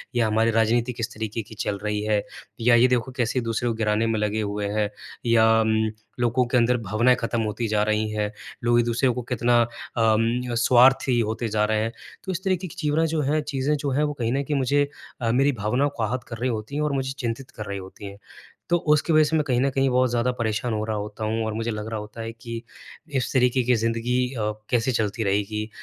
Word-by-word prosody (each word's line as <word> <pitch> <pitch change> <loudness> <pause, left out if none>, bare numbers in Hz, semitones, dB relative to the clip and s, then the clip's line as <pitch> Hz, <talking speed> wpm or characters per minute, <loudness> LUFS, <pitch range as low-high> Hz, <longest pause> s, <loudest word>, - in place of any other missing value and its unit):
या 115 -2 +3
हमारी 110 +1 +2
राजनीति 115 +2 +2
किस 115 0 -4
तरीके 110 +1 -4
की - - -9
चल 100 -2 -2
रही 105 0 -1
है 105 -1 +1 0.4
या 120 +1 +5
ये 120 +2 +6
देखो 125 0 0
कैसे 125 +1 0
दूसरे 115 +1 -1
को - - 0
गिराने 110 0 +1
में 110 -1 0
लगे 105 +1 0
हुए 100 0 -2
हैं 105 0 0 0.4
या 115 -1 +5 0.3
अम, 110 0 +1 0.3
लोगों 120 +1 +2
के 125 - +2
अंदर 120 +1 +3
भावनाएँ 115 +4 +2
खत्म 115 0 -1
होती 110 +2 -2
जा 105 0 +1
रही 110 0 0
हैं, 105 -1 -2 0.3
लोग 120 0 +4
एक-दूसरे 120 +2 +2
को 125 +1 -1
कितना 120 0 +3 0.4
अम, 115 +2 +2
स्वार्थी 125 +1 +5
होते 110 +1 -1
जा 105 0 +1
रहे 110 0 +1
हैं। 115 +1 -1 0.3
तो 190 - -3
इस 185 +2 -4
तरीके 185 -1 0
की - - -12
चिवरा 155 +2 +1
जो 155 - +1
हैं 150 +2 +1
चीज़ें 140 +1 0
जो 140 0 -2
हैं 145 +3 +1
वो 150 0 0
कहीं 115 0 0
न 140 +1 0
कहीं 145 +1 -1
मुझे 140 +2 +2 0.3
अ, 115 -1 +1
मेरी 135 +4 +3
भावनाओं 125 +5 0
को 115 - -1
आहत 125 +4 -2
कर 115 - -6
रही 125 +2 -1
होती 110 +4 -4
है 150 - 0
और 150 -1 0
मुझे 135 -1 -1
चिंतित 120 +1 -4
कर 105 - -7
रही 100 0 -4
होती 95 +2 -10
हैं। 100 0 -8 0.5
तो 175 - +4 0.2
उसकी 155 +2 +1
वजह 155 0 +6
से 160 +2 0
मैं 155 - +3
कहीं 125 -2 +2
न 140 - +2
कहीं 135 0 +2
और 125 0 +3
ज़्यादा 120 +1 +1
परेशान 115 0 -1
हो 105 0 -1
रहा 110 -1 -2
होता 105 +1 -5
हूँ 110 +1 -1
और 110 - -2
मुझे 115 +1 -2
लग 105 0 -5
रहा 110 -1 -3
होता 105 +2 -8
है 115 0 -4
कि 115 0 -7 0.5
इस 130 - 0
तरीके 125 0 +3
की 125 0 +3
ज़िंदगी 115 +2 0 0.2
अ, 105 -1 -1 0.2
कैसे 120 +1 +1
चलती 110 -1 -1
रहेगी 105 +2 -1
115 Hz, 235 wpm, -24 LUFS, 110-125 Hz, 0.5 s, ये